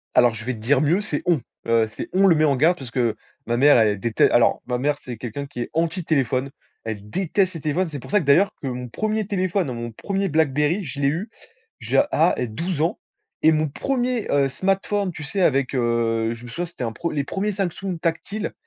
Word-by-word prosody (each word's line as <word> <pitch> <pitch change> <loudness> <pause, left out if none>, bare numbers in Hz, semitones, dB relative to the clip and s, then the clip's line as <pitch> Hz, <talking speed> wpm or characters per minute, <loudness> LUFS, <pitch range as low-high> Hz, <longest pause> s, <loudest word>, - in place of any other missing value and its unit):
Alors, 120 -2 +5
je 115 +1 -8
vais 130 - -1
te 110 - -9
dire 130 +5 +2
mieux, 170 +7 +2
c'est 150 -8 -3
«on», 165 -7 +2 0.2
heu, 115 -1 +2
c'est - - -6
on 195 +1 +5
le 170 - +6
met 155 - +2
en 140 -2 +3
garde, 165 +7 +3
parce 130 -4 -8
que 120 -3 0 0.3
ma 120 - +1
mère 145 0 +6
elle 105 -2 +3
déte 115 -2 -3
alors - - +4
ma 125 -1 0
mère 145 +3 0
c'est 125 -2 -7
quelqu'un 125 +4 -5
qui 125 -3 -6
est - - -4
anti 165 +2 0
téléphone, 135 -2 0 0.3
elle 105 -2 -6
déteste 185 - 0
les 160 - -6
téléphones. 165 +4 0
C'est 145 -3 -6
pour - - -11
ça 210 - +4
que 160 - -4
d'ailleurs 185 +9 +4
que 135 - -4
mon 125 -1 -4
1er 215 - -1
téléphone, 185 -6 -1
mon 120 0 -5
1er 195 - -2
Blackberry, 155 +4 +1
je 140 -1 -6
l'ai 140 - +2
eu 175 +10 -1 0.5
j'ai - - +3
à 165 +3 +3
12 145 +8 -2
ans, 165 - 0 0.4
et 160 - +6
mon 155 0 +1
1er, 250 - -1
heu, 140 -1 +3
smartphone, 195 +3 0
tu 160 -2 -8
sais, 190 +6 -2
avec, 140 -5 +2
heu, 115 -2 +1
je 115 +1 -11
me - - -9
souviens, 175 +9 -3
c'était 165 -7 -8
un 115 - -2
pre 170 0 -3
les 145 -2 -1
1ers 200 +8 -2
Samsung 190 -1 -3
tactiles, 200 +6 -2
150 Hz, 230 wpm, -23 LUFS, 125-185 Hz, 0.5 s, le